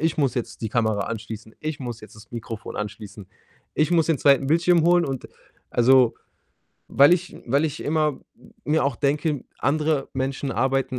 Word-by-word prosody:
Ich 160 0 0
muss 140 -4 +1
jetzt 120 - -4
die 110 - -1
Kamera 110 -3 0
anschließen. 110 0 -7
Ich 155 -2 -4
muss 120 -2 -6
jetzt 110 - -13
das 105 -1 -15
Mikrofon 115 -2 -7
anschließen. 105 -1 -7 0.5
Ich 155 +3 +1
muss 165 -2 +3
den 160 -4 +1
2. 140 0 +4
Bildschirm 170 +1 +4
holen.“ 175 0 +4
Und 135 -2 -5 0.4
also 125 0 +4 0.7
weil 140 +5 +6
ich 180 0 -6
weil 140 +6 +2
ich 155 -1 -3
immer 150 -2 0 0.2
m - - -20
mir 150 +1 +1
auch 140 -4 0
denke, 145 0 0
andere 150 0 0
Menschen 135 +1 -2
arbeiten 135 -1 0
135 Hz, 175 wpm, -24 LUFS, 120-155 Hz, 0.7 s, weil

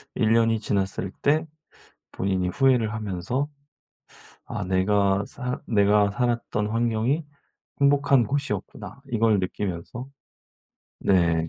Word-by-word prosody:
1 115 -2 +2
년이 115 -1 +3
지났을 100 -2 -2
때 155 +3 +2 0.7
본인이 95 -1 -1
후회를 125 -2 +2
하면서 110 +6 -2 1.0
'아 - - -4
내가 100 +1 +2
사 125 -1 -5
내가 105 -1 +3
살았던 115 -1 -1
환경이 115 +6 0 0.6
행복한 140 -2 +4
곳이었구나.' 105 -3 -4
이걸 115 -2 +3
느끼면서 95 +6 -4 0.9
네 85 -4 +2
110 Hz, 220 characters per minute, -25 LUFS, 95-125 Hz, 1.0 s, 행복한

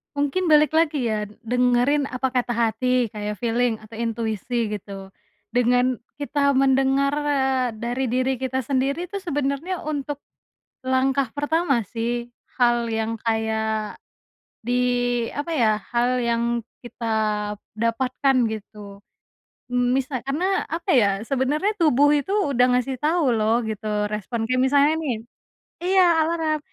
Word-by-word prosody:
Mungkin 290 +6 0
balik 305 -1 +5
lagi 300 -7 +1
ya 210 -1 -2 0.2
dengerin 250 +4 +2
apa 255 +1 -2
kata 245 -1 0
hati 240 0 +1
kayak 210 0 -4
feeling 240 0 +1
atau 215 +1 -15
intuisi 230 +1 -2
gitu, 195 -1 -7 0.4
dengan 245 0 +2 0.2
kita 285 -1 +1
mendengar, 270 +1 +3
eee, 265 -3 +1
dari 245 +4 -2
diri 255 +2 +1
kita 260 0 -2
sendiri 280 +7 -1
tuh 400 - -3
sebenarnya 295 +1 -2
untuk. 290 -1 -4 0.6
Langkah 260 -1 +1
pertama 290 - 0
sih 235 +2 -3 0.3
hal 240 -1 +2
yang 225 0 -1
kayak, 220 -1 -1 0.7
di 245 +2 -2 0.6
apa 290 +4 -4
ya 215 -5 +2 0.2
hal 250 +1 +2
yang 235 0 0 0.2
kita 230 -2 -3 0.6
dapatkan 250 +4 0 0.2
gitu, 205 -2 -9 0.7
mmm, 245 0 +1
misal 265 -1 -1
karena 360 +8 0
apa 335 +3 -4
ya 200 -3 +3
sebenarnya 295 +10 0
tubuh 290 -5 +4
itu 295 +7 -2
udah 265 - +2
ngasih 250 +1 0
tau 310 +2 +1
loh 220 +2 +2
gitu 210 -1 -2
respon 225 +2 -3
kayak 255 0 +2
misalnya 285 +3 +4
nih 295 -7 -2 0.6
iya 375 +2 +3 0.2
alarm, 320 -2 0
255 Hz, 130 wpm, -23 LUFS, 230-285 Hz, 0.7 s, balik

